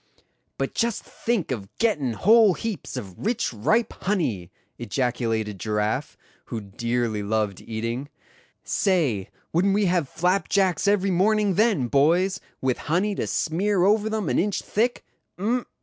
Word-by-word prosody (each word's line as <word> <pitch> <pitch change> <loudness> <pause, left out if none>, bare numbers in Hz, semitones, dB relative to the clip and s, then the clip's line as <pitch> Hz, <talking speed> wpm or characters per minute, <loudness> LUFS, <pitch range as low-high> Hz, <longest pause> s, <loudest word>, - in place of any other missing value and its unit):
"But - - -2
just 235 -2 0
think 225 - -2
of 100 -6 -4
gettin' 150 - +1
whole 215 - +5
heaps 225 -4 -5
of 95 -3 -7
rich 225 - 0
ripe 215 - +1
honey!" 125 - -1 0.3
ejaculated 115 -3 -1
Giraffe, 105 +6 -1 0.3
who 115 - -4
dearly 115 +1 -2
loved 105 -2 -1
eating; 115 +5 -4 0.5
"say, 145 - +1 0.2
wouldn't 195 +4 +3
we 205 0 +2
have 175 -6 +1
flapjacks 185 +2 +1
every 200 -1 +3
morning 205 +2 +3
then, 210 - +2
boys, 175 +9 +3 0.2
with 130 -2 0
honey 190 +6 +2
to - - -2
smear 180 +4 +1
over 210 +2 +3
them 220 -4 -2
an - - +1
inch 200 +2 0
thick? 240 +4 0 0.3
Um! 235 +6 -1
175 Hz, 135 wpm, -24 LUFS, -, 0.5 s, whole